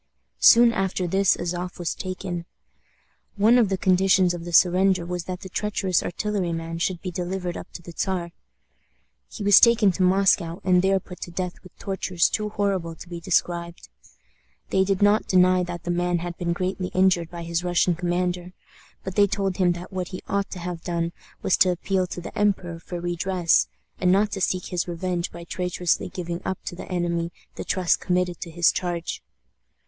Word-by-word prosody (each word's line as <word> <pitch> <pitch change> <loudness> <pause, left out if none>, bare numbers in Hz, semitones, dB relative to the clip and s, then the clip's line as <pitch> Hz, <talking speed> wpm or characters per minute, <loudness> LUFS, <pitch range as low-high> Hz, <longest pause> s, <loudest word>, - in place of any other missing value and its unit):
Soon 235 0 +7
after 190 -2 -1
this 190 +2 +3
Azof 175 +1 -4
was 175 -2 -2
taken. 185 -2 -5 0.9
One 220 +5 +5
of 220 -5 +3
the 190 - 0
conditions 185 -1 +3
of 170 -1 -6
the 175 - -6
surrender 180 +1 +4
was 180 0 -4
that 185 -1 -5
the - - -7
treacherous 195 -2 0
artilleryman 170 -4 -3
should 175 0 -2
be 185 - -3
delivered 180 0 -3
up - - -8
to 170 - -9
the 170 - -10
Czar. 180 -3 -2 1.0
He 215 - -7
was 200 -1 +8
taken 230 -4 +5
to 185 - -4
Moscow, 185 -2 +3
and 180 -1 +4
there 195 +1 +2
put 180 -1 -12
to - - -5
death 180 0 -5
with 185 - -17
tortures 185 -3 0
too 210 -1 -2
horrible 195 -5 -1
to 175 - -12
be 175 -1 -6
described. 170 -1 -1 0.8
They 190 - +3
did 195 0 0
not 205 +1 +3
deny 185 0 +4
that 175 -1 -6
the 175 - -2
man 175 0 0
had 175 0 -5
been 170 -1 -2
greatly 185 +1 -2
injured 185 -3 +3
by 170 -1 -7
his 170 +1 -2
Russian 175 0 +2
commander, 180 +1 -2 0.5
but 190 - -5
they 205 +1 +4
told 195 -2 -1
him 180 -2 +3
that 175 +2 -9
what 185 -1 -3
he 185 - -8
ought 200 0 -1
to - - -7
have 175 -1 -5
done 170 -1 -2 0.3
was 190 - +3
to 185 - +5
appeal 185 +1 0
to 175 - -6
the - - -9
emperor 185 -5 0
for 175 +1 -6
redress, 175 0 +1 0.3
and 180 -1 +3
not 205 +2 +3
to 195 - -4
seek 180 0 0
his 180 -2 -2
revenge 175 0 -3
by 170 0 -9
traitorously 180 0 -1
giving 175 -1 -5
up 190 - -2
to - - -5
the 180 - -9
enemy 170 -1 -1 0.2
the - - -6
trust 185 -3 +1
committed 180 -1 -1
to 170 - -5
his 170 0 +3
charge. 175 -2 -3
180 Hz, 190 wpm, -24 LUFS, 175-190 Hz, 1.0 s, was